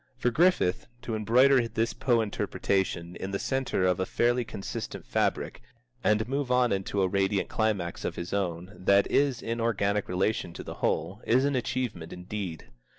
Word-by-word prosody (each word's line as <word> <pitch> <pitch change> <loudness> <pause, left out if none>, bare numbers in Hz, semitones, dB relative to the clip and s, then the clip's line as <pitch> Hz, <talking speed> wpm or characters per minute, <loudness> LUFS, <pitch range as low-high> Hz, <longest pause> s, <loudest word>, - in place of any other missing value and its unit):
For 125 - +1
Griffith 165 - +2 0.2
to 120 - -4
embroider 120 +4 +4
this 115 0 -1
Poe 120 -3 +2
Interpretation 95 -4 -1
in 95 - -5
the 100 - -1
centre 130 -6 0
of 90 0 +2
a 95 - +1
fairly 120 +1 +2
consistent 100 -3 -6
fabric, - - -1 0.4
and 105 +1 +2
move 135 0 -2
on 125 -1 +3
into 100 0 0
a - - +3
radiant 95 +1 0
climax 100 -6 -1
of - - -3
his 85 +2 -5
own 90 -1 -2
that 100 +2 +4
is 140 -3 +2
in 115 +1 -2
organic 105 -3 0
relation 90 -1 0
to - - -7
the - - -7
whole, - - -1
is 130 +4 +4
an 140 -1 +1
achievement 120 -9 -2
indeed. 90 -2 -6
105 Hz, 170 wpm, -28 LUFS, 95-120 Hz, 0.4 s, embroider